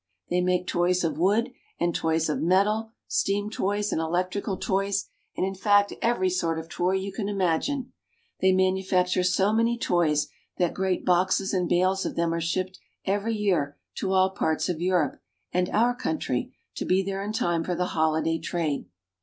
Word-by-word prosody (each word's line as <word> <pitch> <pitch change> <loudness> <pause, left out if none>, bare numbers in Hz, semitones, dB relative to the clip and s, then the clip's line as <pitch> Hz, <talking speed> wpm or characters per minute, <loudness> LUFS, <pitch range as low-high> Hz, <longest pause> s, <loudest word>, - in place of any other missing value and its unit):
They 180 - +2
make 180 0 +1
toys 180 +1 +1
of 165 -1 -1
wood, 215 +8 +2 0.3
and 170 0 +1
toys 160 0 +1
of 150 - -1
metal, 210 +5 +2 0.2
steam 205 +1 0
toys, 205 0 -1
and 160 - 0
electrical 185 +4 -1
toys, 195 0 0 0.3
and - - +1
in 195 - -2
fact 205 +1 +3
every 230 -5 +2
sort 165 -3 0
of 160 0 -6
toy 180 +2 0
you 190 +1 -1
can 200 +1 -3
imagine. 205 - 0 0.5
They 190 - +4
manufacture 185 -1 +2
so 190 +3 +2
many 230 +1 +2
toys 160 -8 +2 0.3
that 175 -2 +1
great 190 -1 -1
boxes 185 +2 +2
and 180 -2 0
bales 185 +2 +2
of - - -3
them 170 0 +1
are 170 - -1
shipped 185 +3 -2 0.3
every 205 +3 0
year 175 -9 0 0.2
to 190 - -1
all 190 0 +4
parts 160 -2 0
of 170 -2 -2
Europe 175 -6 +1 0.3
and 180 0 +1
our 240 +3 +2
country, 255 +5 -2 0.3
to - - -2
be 190 +1 +2
there 195 0 -3
in 205 - -3
time 175 -6 0
for 180 +1 -2
the 180 +1 -1
holiday 160 +1 +1
trade. 160 -3 -2
185 Hz, 180 wpm, -26 LUFS, 175-200 Hz, 0.5 s, They